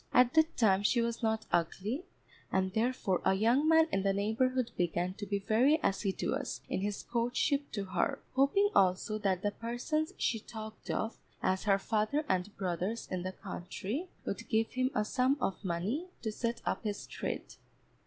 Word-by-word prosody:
At 250 Hz, 0 st, +5 dB
that 315 Hz, 0 st, +3 dB
time 200 Hz, -4 st, +4 dB
she 225 Hz, +4 st, +3 dB
was 235 Hz, 0 st, -1 dB
not 220 Hz, -1 st, 0 dB
ugly, 200 Hz, -, 0 dB, 0.5 s
and 190 Hz, 0 st, +1 dB
therefore 220 Hz, -5 st, +1 dB
a 190 Hz, -, +4 dB
young 235 Hz, +9 st, +3 dB
man 320 Hz, 0 st, +6 dB
in 195 Hz, -, +1 dB
the 195 Hz, 0 st, +2 dB
neighbourhood 235 Hz, +5 st, +1 dB
began 175 Hz, +1 st, 0 dB
to 205 Hz, +1 st, -7 dB
be 200 Hz, 0 st, 0 dB
very 240 Hz, +10 st, +3 dB
assiduous 195 Hz, 0 st, -1 dB
in -, -, -1 dB
his 205 Hz, 0 st, -2 dB
courtship 245 Hz, +4 st, 0 dB
to 200 Hz, -3 st, -2 dB
her, 195 Hz, +9 st, 0 dB, 0.2 s
hoping 280 Hz, +11 st, +3 dB
also 190 Hz, +3 st, +3 dB
that 190 Hz, -3 st, 0 dB
the 205 Hz, -, +1 dB
persons 250 Hz, -, -2 dB
she 225 Hz, -, +1 dB
talked 220 Hz, 0 st, -9 dB
of, 220 Hz, -, -1 dB, 0.3 s
as 185 Hz, +1 st, +1 dB
her 200 Hz, -2 st, +5 dB
father 220 Hz, +9 st, 0 dB
and 185 Hz, +2 st, -1 dB
brothers 185 Hz, +4 st, -2 dB
in 185 Hz, -1 st, -1 dB
the 185 Hz, +1 st, -3 dB
country, 200 Hz, -, -5 dB, 0.2 s
would -, -, -4 dB
give 225 Hz, -1 st, +2 dB
him 255 Hz, 0 st, +1 dB
a 210 Hz, -, +2 dB
sum 255 Hz, +5 st, +2 dB
of 195 Hz, -4 st, -2 dB
money 195 Hz, -, -1 dB, 0.2 s
to 220 Hz, -, -1 dB
set 235 Hz, +2 st, -3 dB
up -, -, -1 dB
his 205 Hz, -2 st, -3 dB
trade. -, -, -4 dB
220 Hz, 175 wpm, -32 LUFS, 195-255 Hz, 0.5 s, man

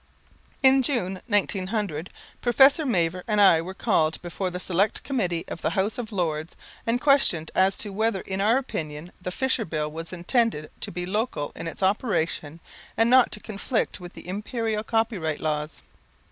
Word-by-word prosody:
In 265 Hz, 0 st, +6 dB
June, 210 Hz, -9 st, -1 dB
1900, 195 Hz, -5 st, -1 dB, 0.3 s
Professor 270 Hz, +5 st, +5 dB
Mavor 180 Hz, -5 st, 0 dB
and 210 Hz, -2 st, +1 dB
I 190 Hz, -5 st, +6 dB
were 185 Hz, +3 st, -7 dB
called 160 Hz, -8 st, +1 dB
before 180 Hz, +2 st, -3 dB
the 180 Hz, 0 st, -5 dB
Select 185 Hz, +3 st, 0 dB
Committee 180 Hz, -11 st, -1 dB
of -, -, -7 dB
the -, -, +1 dB
House 200 Hz, +4 st, -1 dB
of 230 Hz, -2 st, -5 dB
Lords 165 Hz, -4 st, -2 dB, 0.3 s
and 235 Hz, +2 st, +2 dB
questioned 255 Hz, -, +3 dB
as 190 Hz, +1 st, +3 dB
to 205 Hz, -2 st, -4 dB
whether 220 Hz, -1 st, 0 dB
in 190 Hz, 0 st, -3 dB
our 220 Hz, +5 st, +4 dB
opinion 160 Hz, -, -5 dB
the 180 Hz, -, -3 dB
Fisher 260 Hz, +4 st, 0 dB
Bill 155 Hz, -5 st, -3 dB
was 165 Hz, +1 st, -6 dB
intended 185 Hz, -, 0 dB
to -, -, -4 dB
be 175 Hz, +1 st, -4 dB
local 210 Hz, -6 st, -2 dB
in -, -, -6 dB
its 165 Hz, -, -5 dB
operation 170 Hz, -, 0 dB, 0.4 s
and 225 Hz, +1 st, +3 dB
not 255 Hz, -1 st, +6 dB
to 210 Hz, -, -1 dB
conflict 215 Hz, +3 st, -2 dB
with 175 Hz, -1 st, -10 dB
the -, -, -12 dB
Imperial 215 Hz, +2 st, -2 dB
Copyright 215 Hz, -9 st, -1 dB
Laws. 150 Hz, -1 st, -3 dB
195 Hz, 170 wpm, -25 LUFS, 170-225 Hz, 0.4 s, In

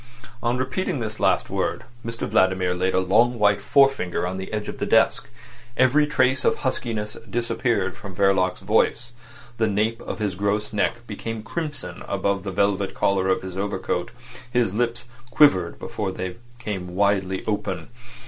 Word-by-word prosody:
On 120 Hz, +1 st, 0 dB
repeating 130 Hz, +6 st, -1 dB
this 110 Hz, -1 st, -4 dB
last -, -, +2 dB
word -, -, -1 dB, 0.2 s
Mr 115 Hz, 0 st, -4 dB
Vladimir 95 Hz, -1 st, +2 dB
laid 95 Hz, +1 st, 0 dB
a -, -, +4 dB
long 115 Hz, +6 st, +3 dB
white 105 Hz, -2 st, +3 dB
forefinger 135 Hz, -12 st, +3 dB
on 90 Hz, +1 st, -3 dB
the 95 Hz, -, -6 dB
edge 105 Hz, -1 st, -3 dB
of -, -, -6 dB
the -, -, -1 dB
desk. -, -, +3 dB, 0.5 s
Every 140 Hz, +4 st, +4 dB
trace 130 Hz, -2 st, +2 dB
of -, -, +3 dB
huskiness 110 Hz, -5 st, -2 dB
disappeared 115 Hz, -5 st, 0 dB
from 100 Hz, -6 st, -9 dB
Verloc's 95 Hz, -1 st, +2 dB
voice. 120 Hz, 0 st, +1 dB, 0.5 s
The 110 Hz, -, +3 dB
nape 110 Hz, +3 st, 0 dB
of -, -, -5 dB
his 105 Hz, -3 st, -1 dB
gross 100 Hz, +3 st, -1 dB
neck 120 Hz, +3 st, 0 dB
became 110 Hz, 0 st, -5 dB
crimson 150 Hz, +4 st, -5 dB
above 100 Hz, -1 st, 0 dB
the 100 Hz, -, -5 dB
velvet 100 Hz, 0 st, 0 dB
collar 95 Hz, -1 st, +1 dB
of 95 Hz, -, +1 dB
his 95 Hz, -1 st, -6 dB
overcoat. 95 Hz, -2 st, -2 dB, 0.4 s
His 120 Hz, -6 st, +1 dB
lips 120 Hz, +1 st, -1 dB, 0.2 s
quivered 95 Hz, -, +4 dB
before 100 Hz, -3 st, -4 dB
they 90 Hz, -1 st, -5 dB, 0.2 s
came 95 Hz, -6 st, -5 dB
widely 95 Hz, -1 st, +1 dB
open. 100 Hz, -4 st, -2 dB
105 Hz, 160 wpm, -24 LUFS, 95-120 Hz, 0.5 s, a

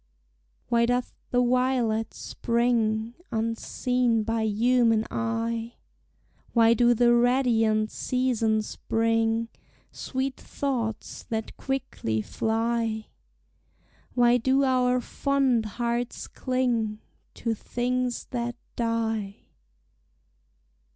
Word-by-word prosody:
Why 235 Hz, 0 st, +3 dB
doth 245 Hz, 0 st, 0 dB, 0.2 s
the 245 Hz, 0 st, +2 dB
violet 245 Hz, -3 st, +1 dB
spring 230 Hz, -1 st, 0 dB, 0.2 s
Unseen 230 Hz, +1 st, 0 dB
by 225 Hz, +1 st, -1 dB
human 225 Hz, 0 st, +3 dB
eye? 230 Hz, 0 st, -2 dB, 0.8 s
Why 230 Hz, -1 st, +6 dB
do 240 Hz, +1 st, +4 dB
the 240 Hz, +1 st, +4 dB
radiant 235 Hz, -3 st, +3 dB
seasons 230 Hz, -4 st, 0 dB
bring 225 Hz, 0 st, +1 dB, 0.4 s
Sweet 260 Hz, 0 st, -3 dB
thoughts 240 Hz, -6 st, -3 dB
that 220 Hz, -1 st, -3 dB
quickly 265 Hz, -, -2 dB
fly? 225 Hz, -, -1 dB, 1.1 s
Why 240 Hz, 0 st, +5 dB
do 265 Hz, +3 st, +2 dB
our 250 Hz, -1 st, +2 dB
fond 270 Hz, -4 st, +1 dB
hearts 240 Hz, 0 st, -2 dB
cling 240 Hz, -5 st, -1 dB, 0.4 s
To 230 Hz, -, -1 dB
things 245 Hz, +2 st, -2 dB
that 240 Hz, -1 st, -2 dB, 0.2 s
die? 225 Hz, -3 st, -1 dB
235 Hz, 85 wpm, -26 LUFS, 225-250 Hz, 1.1 s, Why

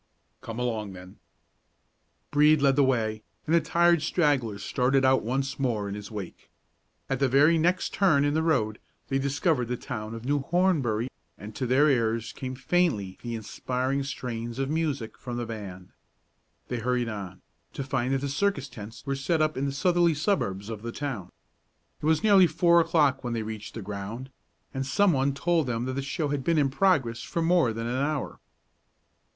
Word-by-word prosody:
"Come 115 Hz, -3 st, -7 dB
along, 110 Hz, -5 st, -2 dB
then!" 90 Hz, 0 st, -12 dB, 1.1 s
Brede 150 Hz, +1 st, +5 dB
led 140 Hz, -1 st, +3 dB
the 145 Hz, -, +4 dB
way, 110 Hz, -5 st, 0 dB, 0.2 s
and 160 Hz, -, 0 dB
the 170 Hz, -, +5 dB
tired 170 Hz, +1 st, +3 dB
stragglers 130 Hz, -, 0 dB
started 130 Hz, +2 st, +2 dB
out 130 Hz, 0 st, +4 dB
once 135 Hz, +5 st, -2 dB
more 115 Hz, -6 st, 0 dB
in 100 Hz, -, -4 dB
his 105 Hz, -1 st, -7 dB
wake. 100 Hz, -5 st, -8 dB, 0.6 s
At 135 Hz, -2 st, -1 dB
the 135 Hz, -, +3 dB
very 145 Hz, +6 st, +5 dB
next 175 Hz, +3 st, +1 dB
turn 155 Hz, -8 st, +3 dB
in 145 Hz, -, +1 dB
the 160 Hz, -, +1 dB
road 110 Hz, -10 st, +1 dB, 0.3 s
they 135 Hz, -, +1 dB
discovered 140 Hz, -1 st, 0 dB
the 125 Hz, +1 st, -2 dB
town 110 Hz, -2 st, -6 dB
of 115 Hz, +1 st, -8 dB
New 145 Hz, +2 st, +1 dB
Hornbury, 140 Hz, -, +1 dB, 0.3 s
and 105 Hz, +3 st, -9 dB
to 130 Hz, -, -2 dB
their 135 Hz, +5 st, +4 dB
ears 115 Hz, -4 st, +1 dB
came 130 Hz, -1 st, -5 dB
faintly 130 Hz, -, 0 dB
the 120 Hz, -1 st, -4 dB
inspiring 130 Hz, +5 st, -2 dB
strains 120 Hz, -3 st, -5 dB
of 135 Hz, +1 st, -1 dB
music 150 Hz, -8 st, -2 dB
from 120 Hz, -1 st, -5 dB
the 120 Hz, -, -2 dB
band. 100 Hz, -5 st, -8 dB, 0.8 s
They 125 Hz, -, -3 dB
hurried 125 Hz, +1 st, 0 dB
on, 100 Hz, -4 st, -7 dB, 0.3 s
to 140 Hz, -, -4 dB
find 130 Hz, -1 st, -1 dB
that 135 Hz, -, -1 dB
the 140 Hz, -, -2 dB
circus 145 Hz, 0 st, 0 dB
tents 110 Hz, -1 st, -10 dB
were 140 Hz, -1 st, -1 dB
set 140 Hz, +5 st, 0 dB
up 155 Hz, 0 st, +1 dB
in 135 Hz, -, -1 dB
the 140 Hz, -, -1 dB
southerly 170 Hz, +4 st, +2 dB
suburbs 115 Hz, -, -1 dB
of 110 Hz, -2 st, -6 dB
the 115 Hz, +1 st, -5 dB
town. 115 Hz, -11 st, -5 dB, 0.7 s
It 150 Hz, -, -1 dB
was 160 Hz, +4 st, +2 dB
nearly 200 Hz, -4 st, +6 dB
four 170 Hz, +2 st, +4 dB
o'clock 155 Hz, -5 st, +2 dB
when 120 Hz, -1 st, -2 dB
they 115 Hz, -1 st, -2 dB
reached 110 Hz, -1 st, -7 dB
the 110 Hz, -, -5 dB
ground, 105 Hz, +6 st, -6 dB, 0.4 s
and 135 Hz, -, -2 dB
some 195 Hz, +8 st, +3 dB
one 135 Hz, 0 st, +1 dB
told 165 Hz, 0 st, +1 dB
them 120 Hz, 0 st, -1 dB
that 130 Hz, -, -3 dB
the 140 Hz, -, -2 dB
show 145 Hz, +2 st, -2 dB
had 140 Hz, -2 st, -2 dB
been 165 Hz, +2 st, +2 dB
in 140 Hz, -3 st, +2 dB
progress 135 Hz, -9 st, +2 dB
for 170 Hz, -, -2 dB
more 170 Hz, -7 st, +3 dB
than 115 Hz, +1 st, -4 dB
an 125 Hz, +3 st, -1 dB
hour. 150 Hz, -1 st, -2 dB
135 Hz, 190 wpm, -27 LUFS, 115-150 Hz, 1.1 s, nearly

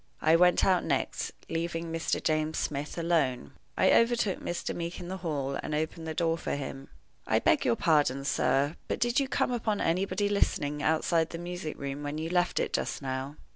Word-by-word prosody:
I 160 Hz, +1 st, +4 dB
went 180 Hz, +1 st, +5 dB
out 185 Hz, -2 st, +3 dB
next, -, -, -1 dB, 0.2 s
leaving 165 Hz, 0 st, -3 dB
Mr. 165 Hz, 0 st, -1 dB
James 155 Hz, 0 st, 0 dB
Smith 145 Hz, +2 st, -3 dB
alone. 155 Hz, -, 0 dB, 0.3 s
I -, -, +4 dB
overtook 230 Hz, -4 st, +3 dB
Mr. 175 Hz, -, -3 dB
Meeke 170 Hz, +1 st, -4 dB
in 175 Hz, -1 st, -7 dB
the 190 Hz, -, -4 dB
hall, 145 Hz, -6 st, -2 dB
and 155 Hz, -, -3 dB
opened 160 Hz, +1 st, -3 dB
the 160 Hz, -, -4 dB
door 165 Hz, 0 st, +1 dB
for -, -, -2 dB
him. 135 Hz, -1 st, -6 dB, 0.4 s
"I -, -, +3 dB
beg -, -, +3 dB
your 115 Hz, -, +3 dB
pardon, 145 Hz, -3 st, +2 dB
sir," 135 Hz, 0 st, +2 dB
I -, -, 0 dB
said, 160 Hz, -, -13 dB
"but -, -, -2 dB
did 240 Hz, +2 st, +2 dB
you 275 Hz, -, 0 dB
come 255 Hz, -, 0 dB
upon 220 Hz, -4 st, -1 dB
anybody 185 Hz, +3 st, +1 dB
listening 150 Hz, -7 st, 0 dB
outside 160 Hz, +1 st, +2 dB
the 165 Hz, -, -6 dB
music 175 Hz, -2 st, -5 dB
room 140 Hz, +1 st, -4 dB
when 145 Hz, +1 st, -4 dB
you 160 Hz, +2 st, -3 dB
left 180 Hz, 0 st, +2 dB
it -, -, -1 dB
just -, -, -2 dB
now?" 135 Hz, +2 st, -3 dB
165 Hz, 205 wpm, -29 LUFS, 145-180 Hz, 0.4 s, went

